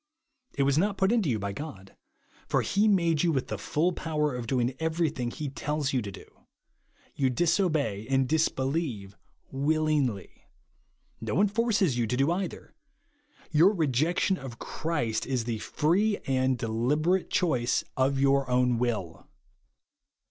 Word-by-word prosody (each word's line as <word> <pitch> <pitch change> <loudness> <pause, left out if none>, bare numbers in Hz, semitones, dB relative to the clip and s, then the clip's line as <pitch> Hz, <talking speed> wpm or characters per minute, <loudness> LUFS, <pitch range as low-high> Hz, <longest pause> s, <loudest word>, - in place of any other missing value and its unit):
It 140 - +2
was 140 +2 +2
not 200 +2 0
put 190 +2 +2
into 220 -10 +2
you 115 - +1
by 100 -1 -4
God; 100 -7 -9 0.5
for - - +2
he 205 +2 +2
made 170 -7 +3
you 175 - +2
with 135 -4 -2
the 110 - -3
full 155 - 0
power 150 -4 -1
of 120 -2 -5
doing 125 0 0
everything 160 -6 -1
he 150 +4 -5
tells 145 +1 -2
you 130 - +1
to 100 -2 -6
do. 95 - -11 0.9
You 135 -2 +1
disobey 150 - 0
and 135 -1 +2
disbelieve 135 - -1 0.4
vjillingjy. 145 - 0 0.9
No - - -3
one 205 +2 +4
forces 205 - +1
you 115 - +1
to 125 - -1
do 135 +5 +2
either. 180 0 -4 0.8
Your 165 +7 +5
rejection 165 - +1
of 130 -4 -8
Christ 120 -10 -2
is 130 -3 0
the 115 -1 -3
feee 195 - +1
AND 130 -1 +1
DELIBERATE 140 +11 0
CHOICE 130 -9 +1
OF 135 +1 +1
YOUR 140 -1 +2
OWN 125 -1 +2
WILL. 110 -9 -3
140 Hz, 150 wpm, -28 LUFS, 125-165 Hz, 0.9 s, Your